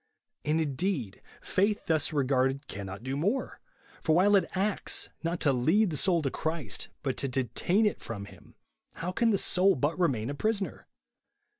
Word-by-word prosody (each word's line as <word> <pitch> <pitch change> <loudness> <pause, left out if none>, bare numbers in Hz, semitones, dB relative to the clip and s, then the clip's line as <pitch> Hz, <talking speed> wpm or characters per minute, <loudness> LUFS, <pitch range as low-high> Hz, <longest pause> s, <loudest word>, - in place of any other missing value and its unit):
And, 155 +2 +1
indeed, 140 - -2 0.2
faith 205 +2 0
thus 160 0 +2
regarded, 135 -1 +1
cannot 100 +1 -7
do 130 +1 -3
more, 205 - -1 0.4
for 155 - +2
while 200 +4 +5
it 195 - +2
acts, 200 +2 +1
not 170 +1 -2
to 140 - +3
lead 165 - +3
the - - -3
soul 170 +1 +2
to 135 - -1
Christ, 155 - -3
but 135 -2 -1
to 140 - 0
detain 130 - +1
it 210 - 0
from 110 -3 -6
him, - - -16 0.4
how 175 +2 -4
can 230 +5 +2
the 205 - +3
soul 190 +1 +4
but 145 +7 -1
remain 135 -8 +1
a - - -3
prisoner? 205 +5 -2
155 Hz, 170 wpm, -29 LUFS, 130-190 Hz, 0.4 s, while